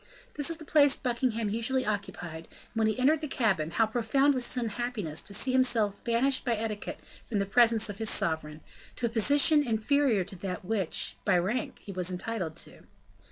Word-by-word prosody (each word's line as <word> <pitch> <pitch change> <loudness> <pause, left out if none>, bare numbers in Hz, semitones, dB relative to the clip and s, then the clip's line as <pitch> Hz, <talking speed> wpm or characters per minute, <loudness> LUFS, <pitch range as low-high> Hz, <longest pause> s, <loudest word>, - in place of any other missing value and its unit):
This 290 - 0
was 330 - 0
the 315 - -11
place 290 -2 +5
Buckingham 235 -4 -1
usually 255 +4 0
occupied; 190 -6 -5
and - - -21
when 225 -1 +1
he 215 - -1
entered 285 +5 +2
the 305 - -3
cabin, 200 - 0
how 225 +7 +2
profound 245 +6 +1
was 255 -2 0
his - - 0
unhappiness 225 -8 -3
to - - -5
see 260 - +1
himself 230 -6 +1
banished 255 +3 +1
by 240 - 0
etiquette 215 -1 -5 0.3
from 220 - -1
the 200 - 0
presence 230 +1 +4
of 205 0 -6
his 220 -1 +1
sovereign, 155 -1 0 0.3
to 245 - -3
a - - 0
position 285 +7 +5
inferior 230 -1 +1
to 195 +2 -8
that 180 0 -6
which, 195 -4 -1
by 195 -3 +3
rank, 205 +8 -2
he 200 - -7
was 180 -1 -1
entitled 180 -3 -4
to. - - -6
225 Hz, 195 wpm, -28 LUFS, 195-255 Hz, 0.3 s, place